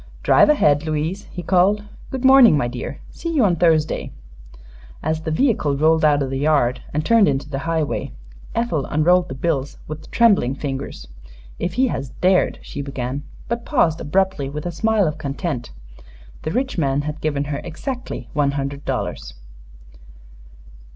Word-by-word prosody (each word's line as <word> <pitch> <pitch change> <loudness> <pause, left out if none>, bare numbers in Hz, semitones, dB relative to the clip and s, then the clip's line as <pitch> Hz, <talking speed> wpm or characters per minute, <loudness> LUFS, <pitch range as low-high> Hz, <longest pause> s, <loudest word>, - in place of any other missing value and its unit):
"Drive - - +5
ahead, 150 - +4
Louise," 160 +5 -2
he 175 - -8
called. 190 +4 +3 0.3
"Good 265 -1 -3
morning, 260 - +8
my 120 - 0
dear. 120 0 -6
See 335 - -5
you 260 -7 +4
on 180 -3 +3
Thursday." 160 -2 +1 0.9
As 155 +1 -1
the 160 - -4
vehicle 155 - +1
rolled 160 +2 +3
out 145 -2 +4
of 135 - -4
the 135 - -2
yard 140 -4 +2
and 150 +1 -2
turned 230 -3 +5
into 135 0 -1
the 135 -2 -4
highway, 160 -3 -1 0.4
Ethel 200 - -1
unrolled 175 +4 +3
the - - -5
bills 140 -1 -2
with 155 +1 -8
trembling 200 - +3
fingers. 140 -1 -5 0.5
"If 175 - -2
he 260 +5 +3
has 135 - -4
dared 185 0 +3
!" - - -20
she 145 - -6
began, 135 -1 -4 0.3
but 235 0 -3
paused 170 - +1
abruptly 185 -3 0
with 150 +2 -6
a 175 - -2
smile 220 +3 +1
of 150 0 -4
content. 140 -2 -4 0.7
The - - -3
rich 260 -2 -1
man 140 -2 +1
had 150 +1 -5
given 145 -2 -1
her 145 0 -4
exactly 250 - -6
one 145 -2 +1
hundred 140 0 -4
dollars. - - -4
155 Hz, 165 wpm, -21 LUFS, 140-190 Hz, 0.9 s, morning